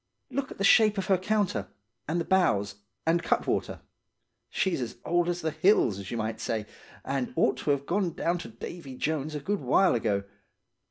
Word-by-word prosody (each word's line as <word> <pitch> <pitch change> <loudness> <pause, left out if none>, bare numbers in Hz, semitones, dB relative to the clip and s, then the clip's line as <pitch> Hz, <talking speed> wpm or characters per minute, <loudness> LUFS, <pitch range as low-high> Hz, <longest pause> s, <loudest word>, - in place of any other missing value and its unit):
Look 270 +1 -2
at - - -10
the 195 - -2
shape 215 +1 +6
of 195 - -1
her 190 - +3
counter, 185 - 0 0.4
and 165 +3 0
the 170 - -2
bows 105 - +2 0.3
and 165 +1 +3
cutwater. - - -1 0.7
She's 185 -8 0
as 120 - -5
old 175 0 +2
as 175 0 -2
the 160 - -1
hills, 155 - +3
as 95 -1 -7
you 120 - -3
might 110 0 -3
say, 110 -2 -2 0.4
and 135 -2 -2
ought - - +2
to - - -4
have 140 -1 +1
gone 180 0 0
down 175 +2 -1
to 165 - -7
Davy 130 +5 -8
Jones 150 +2 -2
a - - -2
good 200 +8 -1
while 190 -1 +3
ago. 105 -4 0
160 Hz, 195 wpm, -28 LUFS, 120-190 Hz, 0.7 s, shape